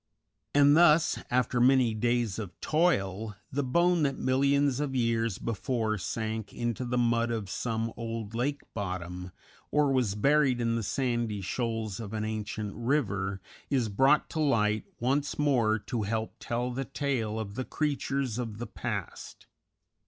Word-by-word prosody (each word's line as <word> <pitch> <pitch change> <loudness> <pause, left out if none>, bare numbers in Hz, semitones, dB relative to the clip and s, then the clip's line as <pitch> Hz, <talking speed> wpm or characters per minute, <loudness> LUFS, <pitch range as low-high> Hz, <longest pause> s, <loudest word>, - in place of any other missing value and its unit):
And 145 0 +6
thus, 165 -1 +5
after 125 0 +1
many 125 -2 +5
days 120 -2 0
of 100 -5 -7
toil, 110 - +1 0.2
the 145 - 0
bone 170 +6 +3
that 140 -2 +1
millions 140 +1 +2
of 145 -2 -2
years 115 -4 +1
before 110 0 -1
sank 110 +2 -3
into 120 +1 -2
the 125 +1 -1
mud 115 -1 +2
of 110 -4 -3
some 115 -1 -2
old 115 -2 -5
lake 140 +5 -1
bottom 90 -2 -4 0.4
or 150 -2 +3
was 125 -7 +1
buried 135 +2 +3
in 115 -1 +1
the 115 - 0
sandy 120 -2 -1
shoals 110 0 -2
of 110 -2 -6
an 110 -1 -2
ancient 105 -1 -4
river, 100 -7 -1 0.3
is 125 -5 +1
brought 135 +9 +4
to 160 - -3
light 110 -8 +2
once 140 +4 0
more 125 -7 +3
to 115 +2 -3
help 110 +2 -2
tell 120 +1 -2
the 135 +2 -3
tale 125 -6 -2
of 105 -2 -5
the 130 - -3
creatures 140 -4 -1
of 115 -4 -4
the 120 - -4
past. 105 -4 -6
115 Hz, 150 wpm, -29 LUFS, 110-135 Hz, 0.4 s, And